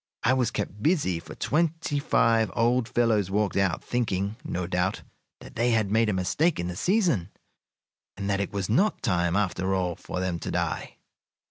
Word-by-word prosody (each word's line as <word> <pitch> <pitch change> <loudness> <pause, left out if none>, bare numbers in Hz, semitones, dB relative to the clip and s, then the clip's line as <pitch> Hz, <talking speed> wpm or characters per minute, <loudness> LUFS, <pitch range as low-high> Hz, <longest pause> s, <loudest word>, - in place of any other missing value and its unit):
I 125 - +4
was 125 -3 +2
kept 105 -2 -4
busy, 140 - +1
for - - -11
twenty 165 -1 0
five 115 -6 +3
old 120 +1 +2
fellows 110 -5 +2
walked 105 +1 0
out, 95 -3 +1
thinking, 100 -4 -1
no 90 0 -3
doubt, 90 +2 -1 0.4
that - - -12
they 120 +2 +2
had 110 -3 +1
made 110 0 +3
a - - +1
mistake 145 - +1
in 85 - -2
the 90 - -4
season, 175 - +1 0.9
and 100 0 -4
that 100 -1 +1
it 100 - -3
was 100 -2 -2
not 190 - +1
time, 90 -6 +1
after 95 -1 0
all, 90 -2 -1
for 90 - -6
them 90 -2 -2
to - - -5
die. - - -2
105 Hz, 185 wpm, -26 LUFS, 95-120 Hz, 0.9 s, I